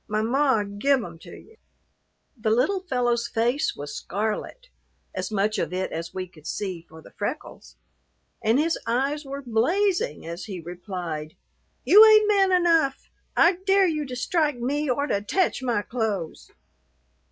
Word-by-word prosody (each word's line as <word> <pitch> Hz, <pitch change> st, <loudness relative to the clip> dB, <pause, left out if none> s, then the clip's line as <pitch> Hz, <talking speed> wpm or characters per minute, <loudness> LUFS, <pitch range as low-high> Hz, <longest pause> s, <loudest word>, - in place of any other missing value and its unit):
My 215 Hz, 0 st, -1 dB
ma 260 Hz, -1 st, +2 dB
give 225 Hz, +6 st, +1 dB
'em 170 Hz, -3 st, -9 dB
to -, -, -13 dB
you." 445 Hz, -, -18 dB, 0.8 s
The 225 Hz, -3 st, -2 dB
little 255 Hz, -, +2 dB
fellow's 245 Hz, -9 st, 0 dB
face 240 Hz, +6 st, 0 dB
was 145 Hz, 0 st, -7 dB
scarlet 220 Hz, -, -4 dB, 0.4 s
as -, -, -3 dB
much 210 Hz, 0 st, 0 dB
of 165 Hz, -2 st, -2 dB
it 185 Hz, +1 st, -2 dB
as 165 Hz, +1 st, -5 dB
we 185 Hz, -1 st, -5 dB
could 160 Hz, -4 st, -15 dB
see 185 Hz, -5 st, -4 dB
for 160 Hz, 0 st, -14 dB
the -, -, -15 dB
freckles 250 Hz, +9 st, -6 dB, 0.7 s
and 225 Hz, +3 st, +3 dB
his 325 Hz, +3 st, +1 dB
eyes 275 Hz, +5 st, 0 dB
were 275 Hz, +1 st, -6 dB
blazing 355 Hz, -, 0 dB
as 170 Hz, +2 st, -6 dB
he 190 Hz, -4 st, -6 dB
replied, 170 Hz, -3 st, -6 dB, 0.5 s
"You 420 Hz, +3 st, +9 dB
ain't 430 Hz, -1 st, +7 dB
man 395 Hz, -2 st, +3 dB
enough. 335 Hz, -6 st, +2 dB, 0.3 s
I 345 Hz, +2 st, +5 dB
dare 390 Hz, 0 st, +5 dB
you 310 Hz, -4 st, 0 dB
to 255 Hz, -, -6 dB
strike 300 Hz, +1 st, 0 dB
me 280 Hz, +5 st, -1 dB
or 280 Hz, +3 st, +1 dB
to 200 Hz, -8 st, -1 dB
tech 345 Hz, -, 0 dB
my 235 Hz, -5 st, 0 dB
clothes." 210 Hz, -9 st, -3 dB
240 Hz, 160 wpm, -25 LUFS, 200-310 Hz, 0.8 s, You